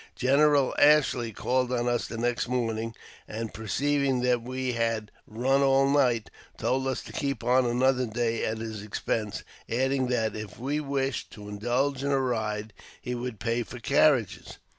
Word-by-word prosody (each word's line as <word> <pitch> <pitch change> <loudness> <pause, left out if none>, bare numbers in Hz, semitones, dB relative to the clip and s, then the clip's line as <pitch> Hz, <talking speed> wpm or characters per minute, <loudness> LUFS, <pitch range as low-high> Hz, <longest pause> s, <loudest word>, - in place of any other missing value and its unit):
General 140 +1 +3
Ashley 145 -6 +4
called 125 +4 0
on 120 -1 0
us 120 -1 0
the 115 - -6
next 120 +1 0
morning, 115 -2 -2 0.3
and, 110 0 -5
perceiving 135 +4 0
that 125 -1 +2
we 130 +1 -3
had 115 -2 -1 0.2
"run 130 +5 +1
all 135 0 +4
night," 130 -5 +2 0.3
told 130 +1 0
us 130 - -2
to - - -10
keep 140 -1 -2
on 125 0 +3
another 125 +1 +2
day 115 +1 -1
at 110 - -1
his 110 -2 -5
expense, 105 0 -3 0.3
adding 130 +2 +1
that, 115 -4 0
if 105 -3 -7
we 140 +5 -2
wished 135 -3 -2
to 105 -1 -10
indulge 120 +6 -1
in 140 - 0
a 140 -1 +2
ride, 110 -4 -2 0.3
he 125 - -4
would 120 -3 -5
pay 115 +1 0
for 120 - -7
carriages. 125 -2 +2
125 Hz, 165 wpm, -27 LUFS, 115-135 Hz, 0.3 s, Ashley